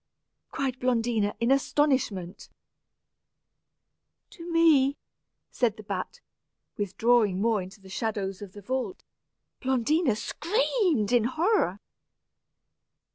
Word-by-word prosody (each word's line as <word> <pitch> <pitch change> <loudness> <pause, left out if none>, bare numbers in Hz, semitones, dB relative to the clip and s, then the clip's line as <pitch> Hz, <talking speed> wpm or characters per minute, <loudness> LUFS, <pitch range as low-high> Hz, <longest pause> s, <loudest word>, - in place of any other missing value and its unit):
cried 260 -2 -3
Blondina, 230 -4 0
in 235 +2 +1
astonishment 265 - 0 1.8
"To 345 -2 -9
me," 300 -5 +4 0.5
said 230 -4 0
the 215 - -10
bat, 200 - -5 0.5
withdrawing 205 0 +2
more 220 -1 +1
into 190 +3 -10
the 195 - -16
shadows 195 -1 -3
of 195 -2 -9
the 205 - -11
vault. 260 - -3 0.6
Blondina 265 +1 +1
screamed 345 - 0
with 240 -3 +3
horror. 315 - +1
240 Hz, 95 wpm, -27 LUFS, 205-285 Hz, 1.8 s, me